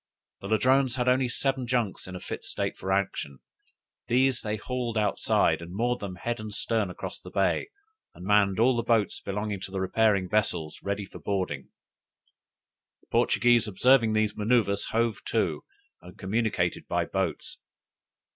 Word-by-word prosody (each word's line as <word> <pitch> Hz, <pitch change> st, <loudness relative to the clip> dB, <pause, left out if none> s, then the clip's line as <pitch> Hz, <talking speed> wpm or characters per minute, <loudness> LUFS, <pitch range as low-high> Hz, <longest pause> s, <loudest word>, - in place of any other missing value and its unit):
The 100 Hz, -, -7 dB
Ladrones 130 Hz, +4 st, +3 dB
had 125 Hz, -1 st, -1 dB
only 125 Hz, 0 st, +3 dB
seven 135 Hz, 0 st, 0 dB
junks 120 Hz, -7 st, -1 dB
in 95 Hz, -, -7 dB
a -, -, -5 dB
fit -, -, -6 dB
state -, -, -2 dB
for 95 Hz, -, -4 dB
action; 95 Hz, -8 st, -1 dB, 0.7 s
these 130 Hz, +1 st, +3 dB
they 105 Hz, 0 st, -2 dB
hauled 120 Hz, 0 st, -3 dB
outside, 95 Hz, -5 st, +2 dB
and 85 Hz, +2 st, -8 dB
moored 120 Hz, +3 st, 0 dB
them 95 Hz, -3 st, -6 dB
head 120 Hz, +5 st, -3 dB
and 110 Hz, 0 st, -6 dB
stern 105 Hz, -1 st, 0 dB
across 90 Hz, -, -7 dB
the -, -, -11 dB
bay, -, -, 0 dB, 0.5 s
and 90 Hz, -, -10 dB
manned 105 Hz, -1 st, +3 dB
all 125 Hz, +2 st, +4 dB
the 120 Hz, -, +1 dB
boats 115 Hz, -3 st, +1 dB
belonging 105 Hz, 0 st, -3 dB
to 95 Hz, -, -6 dB
the 95 Hz, 0 st, -4 dB
repairing 100 Hz, 0 st, +2 dB
vessels 90 Hz, -6 st, 0 dB
ready 100 Hz, 0 st, -3 dB
for -, -, -12 dB
boarding. 90 Hz, -9 st, -3 dB, 1.3 s
The -, -, -30 dB
Portuguese 120 Hz, -2 st, +3 dB
observing 115 Hz, +3 st, +4 dB
these 110 Hz, -1 st, +1 dB
manoeuvres 105 Hz, -2 st, +2 dB
hove 115 Hz, -2 st, -1 dB
to, -, -, 0 dB, 0.4 s
and 90 Hz, -, -13 dB
communicated 100 Hz, -3 st, -1 dB
by -, -, 0 dB
boats. -, -, -3 dB
105 Hz, 160 wpm, -27 LUFS, 95-120 Hz, 1.3 s, all